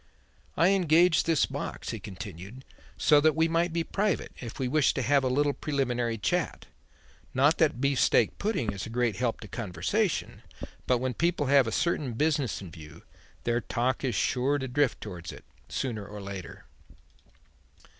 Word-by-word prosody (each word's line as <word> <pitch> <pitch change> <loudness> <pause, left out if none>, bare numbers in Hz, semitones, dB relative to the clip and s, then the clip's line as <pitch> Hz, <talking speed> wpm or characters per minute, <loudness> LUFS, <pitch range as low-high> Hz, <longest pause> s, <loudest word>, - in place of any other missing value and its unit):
"I 165 +4 +5
engaged 175 -3 +4
this 165 -3 +3
box," - - -5
he - - -5
continued, 100 +4 -9 0.3
"so 150 -2 +5
that 155 0 +3
we 160 +1 +3
might 165 +1 +1
be 165 0 0
private 200 +1 -1
if 115 -2 -7
we 130 - -1
wished 150 +1 +2
to 130 - -1
have 140 +3 +3
a - - +1
little 145 +2 +2
preliminary 125 -6 -1
chat; 105 - -1 0.7
not 145 +5 +4
that 150 -6 +2
beef 140 0 +1
steak 115 - +3
pudding 205 - -1
is 95 - -5
a - - -8
great 120 -3 0
help 120 -2 -1
to 105 - -8
conversation. 115 - -2 0.5
But 125 - +3
when 130 +1 -2
people 170 +1 0
have 135 -4 +6
a - - -2
certain 145 -3 0
business 145 -3 0
in 90 - -9
view, 75 -3 -12 0.4
their 120 0 0
talk 125 +3 -1
is 130 -3 -1
sure 135 +3 +1
to 130 -2 -4
drift 135 +1 0
towards 90 -5 -7
it, - - -13 0.2
sooner 115 -6 -3
or 105 +1 -9
later." 100 -2 -8
130 Hz, 175 wpm, -28 LUFS, 115-155 Hz, 0.7 s, have